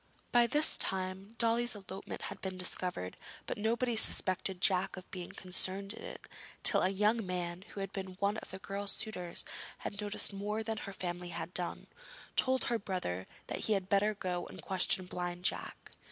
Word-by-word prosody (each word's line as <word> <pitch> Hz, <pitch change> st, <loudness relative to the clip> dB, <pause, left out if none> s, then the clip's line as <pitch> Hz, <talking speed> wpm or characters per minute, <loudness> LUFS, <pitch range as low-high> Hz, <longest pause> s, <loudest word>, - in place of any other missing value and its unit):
By 240 Hz, -1 st, +6 dB
this 300 Hz, +6 st, +4 dB
time 190 Hz, +3 st, +1 dB
Dolly's 235 Hz, 0 st, +3 dB
elopement 195 Hz, -1 st, -7 dB
had -, -, -5 dB
been 190 Hz, -1 st, -3 dB
discovered, 180 Hz, -, 0 dB, 0.3 s
but -, -, -2 dB
nobody 235 Hz, +3 st, +1 dB
suspected 185 Hz, -3 st, +3 dB
Jack 190 Hz, 0 st, +3 dB
of 185 Hz, -, -10 dB
being 180 Hz, -2 st, -5 dB
concerned 190 Hz, +2 st, 0 dB
in -, -, -9 dB
it -, -, -7 dB, 0.4 s
till -, -, +7 dB
a 185 Hz, -, +4 dB
young 210 Hz, +4 st, +3 dB
man, 180 Hz, -1 st, -3 dB
who 200 Hz, -, -5 dB
had 195 Hz, -1 st, -3 dB
been 190 Hz, -1 st, -5 dB
one 200 Hz, +3 st, +1 dB
of -, -, -7 dB
the 190 Hz, -, -5 dB
girl's 200 Hz, 0 st, 0 dB
suitors 180 Hz, -5 st, -2 dB, 0.4 s
and -, -, -1 dB
had 205 Hz, -, -6 dB
noticed 205 Hz, 0 st, +3 dB
more 210 Hz, +2 st, -2 dB
than 220 Hz, 0 st, -2 dB
her 200 Hz, -, -5 dB
family 175 Hz, -1 st, -4 dB
had 175 Hz, +1 st, -5 dB
done, 175 Hz, -1 st, -1 dB, 0.5 s
told 260 Hz, 0 st, +3 dB
her 235 Hz, -1 st, +1 dB
brother 135 Hz, -, -2 dB, 0.2 s
that -, -, -3 dB
he 220 Hz, -, +4 dB
had 195 Hz, -2 st, 0 dB
better 205 Hz, +2 st, +4 dB
go 180 Hz, -3 st, -2 dB
and -, -, -8 dB
question 185 Hz, -1 st, +1 dB
Blind 180 Hz, 0 st, -4 dB
Jack. -, -, -2 dB
195 Hz, 185 wpm, -34 LUFS, 180-210 Hz, 0.5 s, till